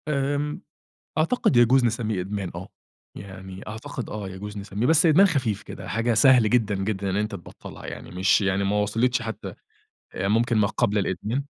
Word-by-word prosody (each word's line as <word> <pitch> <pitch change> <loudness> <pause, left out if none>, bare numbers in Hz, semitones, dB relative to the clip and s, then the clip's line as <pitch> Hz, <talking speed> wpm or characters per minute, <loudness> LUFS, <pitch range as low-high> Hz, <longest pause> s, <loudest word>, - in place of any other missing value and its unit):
آمم، 145 0 -1 0.6
أعتقد 160 - +2
يجوز 120 +2 +5
نسمّيه 110 -4 -1
إدمان 95 0 -4
آه، - - -7 0.5
يعني 95 -1 -9
أعتقد 120 +4 -6
آه 105 -2 -5
يجوز 100 +2 -8
نسمِّيه. 100 +3 -3
بس 160 +4 +4
إدمان 165 +5 +6
خفيف 125 - -1
كده، - - -9
حاجة 115 +1 0
سهل 115 -1 +5
جدًا، 110 -4 +2
جدًا 95 0 -2
إن 95 - -1
أنتَ 105 +1 -1
تبطّلها 85 - -10
يعني، - - -8
مش 95 +4 +3
يعني 100 0 0
ما 100 +1 +1
وصلِتش 115 +4 +1
حتى، 115 -1 -6 0.6
آآ 95 +1 -1
ممكن 115 +2 +2
ما 100 -1 +3
قبل 105 -1 0
الإدمان. 105 +7 -2
110 Hz, 170 wpm, -24 LUFS, 100-125 Hz, 0.6 s, إدمان